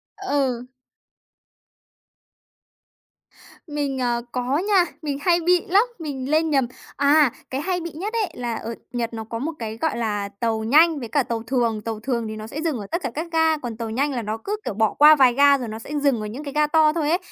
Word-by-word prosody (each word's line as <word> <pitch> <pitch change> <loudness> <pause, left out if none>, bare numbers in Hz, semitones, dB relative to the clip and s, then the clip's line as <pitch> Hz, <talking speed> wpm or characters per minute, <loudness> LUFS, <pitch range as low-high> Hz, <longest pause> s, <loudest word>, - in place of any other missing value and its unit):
Ừ. 275 - -1 3.0
Mình, 290 -3 -2
ờ, 240 -1 0
có 250 +2 -1
nha, 380 0 +3 0.2
mình 290 -3 -3
hay 345 +1 +3
bị 355 +1 +2
lắm, 395 +3 +5 0.2
mình 275 -4 -5
lên 315 +1 +3
nhầm 270 -4 +2 0.3
à, 285 -1 +4 0.2
cái 265 +2 -3
hay 360 +2 -1
bị 335 0 -6
nhất 385 +9 -5
ấy 445 -4 0
là 240 -2 -3
ở 230 +1 -5 0.2
Nhật 240 -2 -3
nó 225 -1 -5
có 230 +1 -6
một 300 +7 -2
cái 220 -1 -5
gọi 320 +2 -1
là 205 -3 -2
tàu 225 -2 0
nhanh 305 +6 +5
với 235 - -5
cả 270 +4 +1
tàu 230 -1 -4
thường, 230 -3 0
tàu 220 0 -4
thường 235 -1 -2
thì 215 - -5
nó 215 0 -7
sẽ 290 +7 -5
dừng 320 -5 -1
ở 200 - -7
tất 340 - -1
cả - - -2
các 320 +3 -3
ga, 320 -1 +3
còn 240 -6 -6
tàu 230 -1 -4
nhanh 275 +6 0
là 245 - -2
nó 215 0 -3
cứ, 415 - -2
kiểu, - - -2
bỏ 220 0 +1
qua 300 +1 +8
vài 260 -4 +5
ga 280 +2 +5
rồi 250 -3 -5
nó 220 0 -6
sẽ 230 - -8
dừng 275 -6 +2
ở - - -4
những 245 +8 -7
cái 280 -2 -6
ga 300 0 +3
to 310 0 +4
thôi 310 -3 0
ấy. 340 - +3
275 Hz, 230 wpm, -23 LUFS, 230-315 Hz, 3.0 s, qua